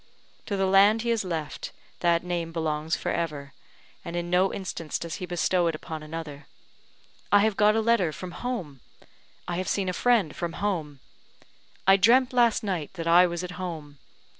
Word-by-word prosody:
To 200 Hz, -, -2 dB
the 195 Hz, -, +1 dB
land 200 Hz, +4 st, +5 dB
he 235 Hz, -, -2 dB
has 230 Hz, -3 st, 0 dB
left, 165 Hz, -5 st, -4 dB, 0.3 s
that 170 Hz, -1 st, +2 dB
name 175 Hz, -2 st, -3 dB
belongs 160 Hz, -1 st, -1 dB
for -, -, -3 dB
ever, 145 Hz, -5 st, -3 dB, 0.5 s
and 170 Hz, -, -6 dB
in 175 Hz, 0 st, -3 dB
no 185 Hz, +2 st, +3 dB
instance 170 Hz, -5 st, -4 dB
does 170 Hz, -1 st, -5 dB
he 180 Hz, -, -6 dB
bestow 175 Hz, 0 st, +1 dB
it 165 Hz, -, -1 dB
upon 155 Hz, 0 st, -7 dB
another. 155 Hz, -2 st, -8 dB, 0.8 s
"I 205 Hz, -, +6 dB
have 215 Hz, -1 st, +2 dB
got 210 Hz, +1 st, +4 dB
a 225 Hz, -, +2 dB
letter 220 Hz, -7 st, +2 dB
from 180 Hz, +3 st, -8 dB
home!" 180 Hz, -, -5 dB, 0.7 s
"I 175 Hz, -, -2 dB
have 185 Hz, -, -3 dB
seen 195 Hz, -2 st, 0 dB
a -, -, -2 dB
friend 220 Hz, -6 st, +2 dB
from 170 Hz, -1 st, -4 dB
home!" 160 Hz, -10 st, -3 dB, 0.8 s
"I 195 Hz, 0 st, +6 dB
dreamt 245 Hz, +6 st, +4 dB
last 235 Hz, -3 st, +3 dB
night 185 Hz, -6 st, -3 dB
that 165 Hz, -2 st, -5 dB
I 175 Hz, +2 st, +6 dB
was 175 Hz, 0 st, -4 dB
at 180 Hz, -, -5 dB
home!" 155 Hz, -5 st, -6 dB
175 Hz, 185 wpm, -26 LUFS, 160-200 Hz, 0.8 s, I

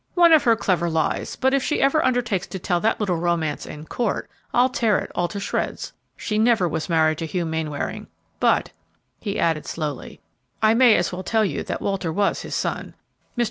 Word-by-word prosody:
"One 340 Hz, -2 st, +6 dB
of 315 Hz, -, +5 dB
her 230 Hz, -1 st, +5 dB
clever 180 Hz, -6 st, 0 dB
lies; 160 Hz, -1 st, -1 dB
but 265 Hz, +1 st, +1 dB
if 275 Hz, -, +3 dB
she 300 Hz, -, -1 dB
ever 275 Hz, +3 st, +3 dB
undertakes 240 Hz, -7 st, 0 dB
to 190 Hz, -, -6 dB
tell 175 Hz, -1 st, 0 dB
that 220 Hz, +5 st, +1 dB
little 190 Hz, -5 st, 0 dB
romance 165 Hz, -3 st, -1 dB
in 150 Hz, +1 st, -8 dB
court, 230 Hz, +5 st, -2 dB, 0.2 s
I'll 245 Hz, +1 st, +4 dB
tear 230 Hz, -5 st, +1 dB
it -, -, -5 dB
all 175 Hz, -, 0 dB
to 200 Hz, +2 st, -6 dB
shreds. 195 Hz, -, -3 dB, 0.2 s
She 215 Hz, -1 st, -2 dB
never 220 Hz, -5 st, +3 dB
was 160 Hz, +2 st, -3 dB
married 160 Hz, -2 st, +2 dB
to 165 Hz, -, -3 dB
Hugh 175 Hz, +1 st, -2 dB
Mainwaring; 160 Hz, -3 st, -3 dB, 0.3 s
but," -, -, +2 dB, 0.5 s
he 205 Hz, -2 st, -3 dB
added, 160 Hz, -2 st, 0 dB
slowly, 150 Hz, -4 st, -5 dB, 0.4 s
"I 215 Hz, 0 st, +4 dB
may 235 Hz, -2 st, +6 dB
as -, -, +1 dB
well 180 Hz, -, -4 dB
tell 220 Hz, +3 st, +1 dB
you -, -, -2 dB
that -, -, -4 dB
Walter 195 Hz, -4 st, -1 dB
was 200 Hz, +4 st, 0 dB
his -, -, -5 dB
son. -, -, -3 dB, 0.4 s
Mr. -, -, -3 dB
195 Hz, 205 wpm, -23 LUFS, 165-230 Hz, 0.5 s, One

